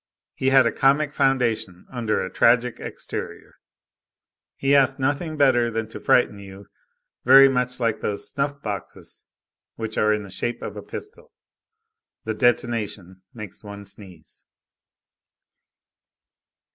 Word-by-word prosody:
He 130 - 0
had 135 -1 +6
a 115 - +2
comic 145 +2 +2
foundation 115 - 0
under 115 -4 -1
a 95 - -9
tragic 120 0 +3
exterior, - - -7 1.0
he 140 +1 +1
asked 135 -1 +3
nothing 145 +4 -1
better 125 -4 +3
than 110 -1 -3
to - - -9
frighten 105 -4 +2
you, 100 0 -11 0.6
very 135 +2 +8
much 125 -1 -1
like 115 -3 -1
those 100 -1 0
snuff 140 0 -3
boxes 100 -4 -7 0.5
which 110 -1 -4
are 105 - +3
in 105 0 0
the 100 - -11
shape 120 +5 -4
of - - -6
a - - -6
pistol. 420 +2 -9 0.9
The 110 - -2
detonation 110 -5 -1
makes 105 -4 -9
one 100 -1 -9
sneeze. 95 -5 -12
115 Hz, 130 wpm, -23 LUFS, 105-135 Hz, 1.0 s, very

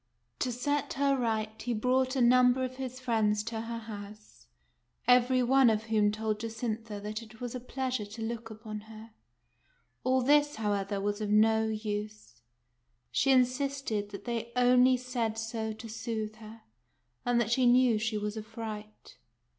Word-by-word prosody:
To 255 - 0
set 285 +4 -1
her 275 0 +2
right, 220 -3 -2
he 240 0 -2
brought 255 +4 +1
a 260 - +1
number 250 +1 +5
of 255 0 -4
his 260 -1 -5
friends 220 -4 +1
to 225 0 -4
her 230 +1 -5
house, 210 - -10 0.6
every 250 +1 +5
one 265 0 +5
of 215 -1 +1
whom 215 -2 +2
told 215 0 -2
Jacintha 225 -1 -4
that 210 +2 -5
it 220 -1 -14
was 245 -1 -5
a 250 - -4
pleas 255 0 -3
ure 210 - -5
to 220 +3 -9
look 225 0 -4
upon 215 -1 -7
her. 220 +1 -11 0.9
All 260 0 +2
this, 295 +2 +4
however,, 205 -2 -1
was 205 +1 -2
of 210 - -2
no 220 +1 +4
use. 215 - -5 0.7
She 270 - +1
insisted 255 -4 +1
that 200 -1 -9
they 235 -1 -3
only 250 +1 +5
said 240 -3 -2
so 225 0 -3
to 220 +2 -9
soothe 220 -1 -4
her, 220 0 -12 0.6
and 245 -1 +2
that 230 -1 0
she 250 +1 +4
knew 245 -2 +5
she 220 0 -1
was 210 0 -3
a 220 - -4
fright. 215 -1 -8
225 Hz, 170 wpm, -30 LUFS, 215-250 Hz, 0.9 s, number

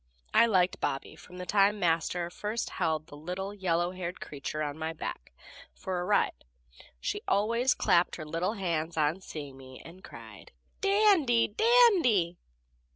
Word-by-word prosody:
I 235 - +6
liked 185 -4 +2
Bobby 135 +3 -3
from 180 +3 -14
the 180 - -6
time 205 +2 +3
Master 170 0 0
first 210 +5 -4
held 155 -1 -1
the 145 - -13
little 180 +6 -5
yellow 175 -3 0
haired 180 -1 -6
creature 150 +1 -5
on 145 -1 -3
my 160 +1 -4
back, 60 - -7 0.4
for 180 - -4
a - - -3
ride; 205 +2 +2 0.5
and - - -17
she - - -3
always 230 +5 +2
clapped 175 +1 +2
her 155 - -7
little 165 +6 -2
hands 170 -5 -2
on 155 +4 +1
seeing 145 -6 -8
me, 130 -1 -12
and 180 +3 -13
cried, - - -12 0.3
"Dandy! 390 - +3
Dandy!" 280 - +4
180 Hz, 160 wpm, -29 LUFS, 160-210 Hz, 0.5 s, I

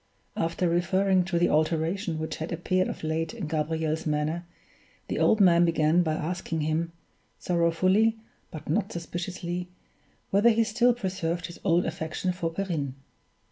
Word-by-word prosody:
After 165 +2 0
referring 185 +2 +2
to 175 -1 -1
the 175 - +3
alteration 160 +3 0
which 160 0 -4
had 160 - -5
appeared 185 +2 0
of - - -6
late 160 +6 -2
in 215 -7 -4
Gabriel's 160 +1 -1
manner, 155 +3 -1 0.6
the - - -1
old 220 - +4
man 175 -3 +6
began 165 0 +3
by 160 -3 0
asking 165 0 -3
him, 160 +2 -1 0.5
sorrowfully 185 +6 +2 0.3
but 155 - -9
not 195 +6 0
suspiciously, 175 +1 -4 0.6
whether 205 +4 +5
he 230 0 +3
still 235 +2 +3
preserved 180 -6 -2
his 170 - -9
old 175 -2 +3
affection 165 +2 -2
for 175 -2 -2
Perrine. 165 -7 -3
170 Hz, 145 wpm, -27 LUFS, 160-185 Hz, 0.6 s, man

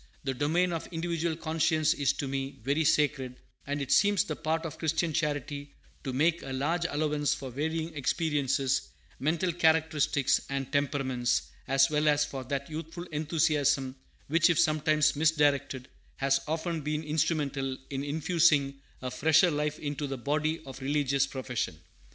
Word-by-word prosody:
The 135 - -1
domain 165 +7 +1
of 165 - -4
individual 170 -1 -2
conscience 160 -1 +1
is 145 -4 +1
to 140 - -4
me 135 0 -4
very 140 +5 +1
sacred; 135 -4 +1 0.3
and 145 0 -2
it 135 - -5
seems 205 -1 +4
the - - -4
part 160 +1 -2
of 160 - -6
Christian 160 +1 0
charity 145 -2 -3 0.3
to 135 - -3
make 160 +6 +2
a 135 - -7
large 165 +6 0
allowance 150 -1 0
for 135 -3 -7
varying 160 +4 -2
experiences; 140 -2 0 0.3
mental 165 +5 0
characteristics, 160 -4 +2
and 135 -1 -3
temperaments, 130 - 0 0.2
as 135 +2 +4
well 150 0 +1
as 145 0 +4
for 135 -3 -6
that 140 +2 -3
youthful 160 +2 -6
enthusiasm 150 -4 +1 0.3
which, 165 +3 +4
if 170 - +2
sometimes 155 -1 +3
misdirected, 145 -4 +1 0.3
has 135 0 +2
often 165 +1 -2
been 150 +1 -2
instrumental 150 -4 -1
in 135 0 -2
infusing 145 -2 +2 0.2
a 125 - -3
fresher 160 +6 +4
life 150 0 -1
into 145 -1 -4
the 135 -1 -4
body 155 +5 -1
of 135 0 -9
religious 140 0 +1
profession. 125 - -4
150 Hz, 150 wpm, -29 LUFS, 135-160 Hz, 0.3 s, seems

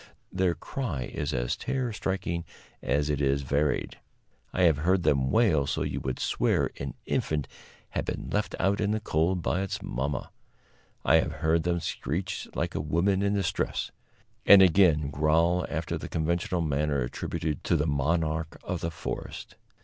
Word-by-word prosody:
Their 90 -2 +1
cry 95 - -4
is 75 - -2
as - - -1
terror 130 -4 -2
striking 95 -4 -2 0.4
as 70 +1 +1
it 75 -1 0
is 70 0 +1
varied. 70 +2 0 0.5
I 90 - +1
have 80 -5 +5
heard 90 +4 +2
them 70 -4 +2
wail 80 - +3
so 70 - -1
you - - -2
would 65 -1 -3
swear - - +1
an 70 -2 -5
infant 75 -3 -1 0.4
had - - -2
been - - -4
left - - -1
out 100 +3 +2
in 105 - +1
the 110 +1 +1
cold 85 -2 0
by 90 - 0
its 95 - -3
mamma; 65 +2 -3 0.7
I 80 - +6
have 80 -1 0
heard 80 +1 +3
them 85 0 0
screech 90 +6 -3
like - - -1
a - - -1
woman 90 +6 +1
in 100 0 +1
distress; 95 -2 -1 0.5
and, 100 -1 +9
again, 80 -5 +4
growl 80 +4 +2
after 80 +1 -3
the - - -7
conventional 85 +2 0
manner 75 -2 0
attributed 75 +5 -3
to - - +3
the 75 -2 +1
monarch 80 +2 0
of 90 -2 -3
the 85 - -1
forest. 85 - -6
80 Hz, 165 wpm, -28 LUFS, 75-90 Hz, 0.7 s, and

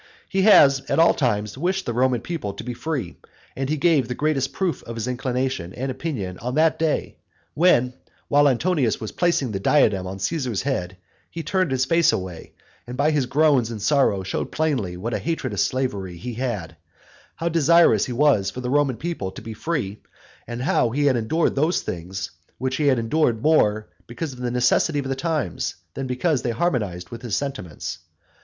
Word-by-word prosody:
He 195 -2 0
has 140 -9 +7
at - - +1
all 165 +1 +6
times 105 -3 -1
wished 185 +4 -1
the 120 - -2
Roman 125 -1 +2
people 120 - -4
to - - -7
be 125 +1 -4
free, 145 +1 -4 0.4
and 135 0 -3
he 155 - 0
gave 150 -5 +3
the 125 - -4
greatest 145 -2 0
proof 185 -4 -2
of 115 - -8
his 115 +1 -3
inclination 125 -7 -2
and 130 +2 -3
opinion 125 - -4
on 125 +3 -4
that 160 +1 +3
day, 160 -2 -1 0.4
when, 135 -7 +3 0.3
while 145 0 +4
Antonius 135 - +1
was 110 - -5
placing 170 -8 +1
the 100 - -3
diadem 95 -6 +3
on 95 +1 -5
Caesar's 125 - -2
head, 95 -10 -2 0.3
he 165 - -6
turned 185 -1 0
his 130 -1 +1
face 165 +4 +4
away, 90 -3 -5 0.3
and 125 +1 -6
by 145 +3 +3
his 145 -4 +1
groans 140 -5 +3
and 115 -2 -5
sorrow 110 -4 +2
showed 95 - -3
plainly 130 - -1
what 115 +6 -4
a - - 0
hatred 165 0 -2
of - - -3
slavery 100 -9 -1
he 120 +8 -6
had, 110 -9 -3 0.6
how 165 - -3
desirous 165 -8 +4
he - - -5
was 125 -7 +3
for 125 - -7
the 125 0 -3
Roman 140 -4 +2
people 155 - -3
to - - -10
be 115 0 -6
free, 110 -4 -3 0.5
and 120 +1 -4
how 125 - +2
he 145 +5 0
had 135 -3 +4
endured 120 +9 +1
those 155 +6 +1
things 90 +2 -5 0.3
which 130 0 -2
he 150 - +1
had 130 -2 +4
endured 115 0 +1
more 110 - +3 0.2
because 130 +5 -5
of 125 - -13
the 125 -1 -2
necessity 125 +5 +2
of 140 -2 -2
the 135 - 0
times, 155 - -2 0.2
than 135 -1 -4
because 130 +2 0
they 125 - -2
harmonised 110 - -1
with 115 -1 -7
his 115 -5 -2
sentiments. 135 - -5
130 Hz, 195 wpm, -23 LUFS, 110-155 Hz, 0.6 s, has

